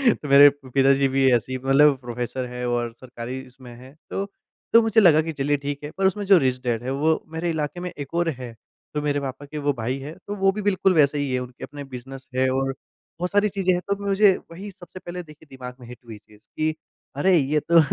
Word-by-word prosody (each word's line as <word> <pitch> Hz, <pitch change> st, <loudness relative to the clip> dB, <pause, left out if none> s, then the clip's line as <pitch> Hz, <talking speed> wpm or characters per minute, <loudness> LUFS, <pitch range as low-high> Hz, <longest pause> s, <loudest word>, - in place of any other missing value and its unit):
तो 150 Hz, -, -9 dB
मेरे 140 Hz, +1 st, +9 dB, 0.2 s
पिताजी 135 Hz, +1 st, +3 dB
भी 135 Hz, 0 st, +3 dB
ऐसे 120 Hz, +2 st, -2 dB
ही 130 Hz, -, -1 dB
मतलब 140 Hz, +1 st, +5 dB
प्रोफ़ेसर 125 Hz, +1 st, -4 dB
हैं 125 Hz, 0 st, -5 dB
और 120 Hz, -1 st, -1 dB
सरकारी 125 Hz, +1 st, -7 dB
इसमें 130 Hz, -1 st, -14 dB
हैं 130 Hz, +3 st, -14 dB
तो 195 Hz, -, -2 dB, 0.5 s
तो 230 Hz, -, +8 dB
मुझे 220 Hz, 0 st, +3 dB
लगा 160 Hz, -5 st, +6 dB
कि 160 Hz, +1 st, -4 dB
चलिए 145 Hz, +1 st, +1 dB
ठीक 145 Hz, +1 st, -4 dB
है 150 Hz, -, -5 dB
पर 195 Hz, -, +1 dB
उसमें 205 Hz, +2 st, -1 dB
जो 195 Hz, -1 st, +7 dB
रिच 130 Hz, -1 st, 0 dB
डैड 120 Hz, -1 st, -1 dB
है 130 Hz, -, -3 dB
वो 160 Hz, +1 st, +2 dB
मेरे 170 Hz, +1 st, -2 dB
इलाके 155 Hz, +1 st, -3 dB
में 180 Hz, 0 st, -5 dB
एक 145 Hz, 0 st, -7 dB
और 170 Hz, 0 st, +1 dB
है 120 Hz, -2 st, -7 dB, 0.4 s
तो 150 Hz, -, -1 dB
मेरे 145 Hz, -1 st, 0 dB
पापा 140 Hz, 0 st, -6 dB
के 150 Hz, +2 st, -8 dB
वो 145 Hz, -, +3 dB
भाई 120 Hz, +4 st, -2 dB
हैं 150 Hz, +4 st, -8 dB
तो 205 Hz, -, -3 dB
वो 195 Hz, -1 st, +3 dB
भी 210 Hz, +2 st, -5 dB
बिल्कुल 195 Hz, -2 st, +2 dB
वैसे 150 Hz, -2 st, +3 dB
ही 140 Hz, -2 st, -2 dB
हैं 125 Hz, -, +1 dB
उनके 125 Hz, 0 st, -9 dB
अपने 145 Hz, 0 st, -7 dB
बिज़नेस 135 Hz, +2 st, -10 dB
हैं 130 Hz, 0 st, +2 dB
और 135 Hz, +1 st, 0 dB, 0.5 s
बहुत 180 Hz, +1 st, -2 dB
सारी 205 Hz, +1 st, +3 dB
चीजें 190 Hz, -2 st, 0 dB
हैं 180 Hz, -, -1 dB
तो 200 Hz, -, +2 dB
मुझे 195 Hz, -1 st, +4 dB, 0.2 s
वही 195 Hz, +4 st, -8 dB
सबसे 185 Hz, 0 st, -12 dB
पहले 180 Hz, 0 st, -7 dB
देखिए 155 Hz, -1 st, -17 dB
दिमाग 125 Hz, -1 st, -9 dB
में 120 Hz, -, -12 dB
हिट 125 Hz, -, -10 dB
हुई 110 Hz, -2 st, -9 dB
चीज़ 105 Hz, 0 st, -22 dB
कि 155 Hz, 0 st, 0 dB, 0.4 s
अरे! 185 Hz, +5 st, +4 dB
ये 150 Hz, +1 st, +1 dB
तो 170 Hz, -, +6 dB
145 Hz, 240 wpm, -23 LUFS, 130-175 Hz, 0.5 s, मेरे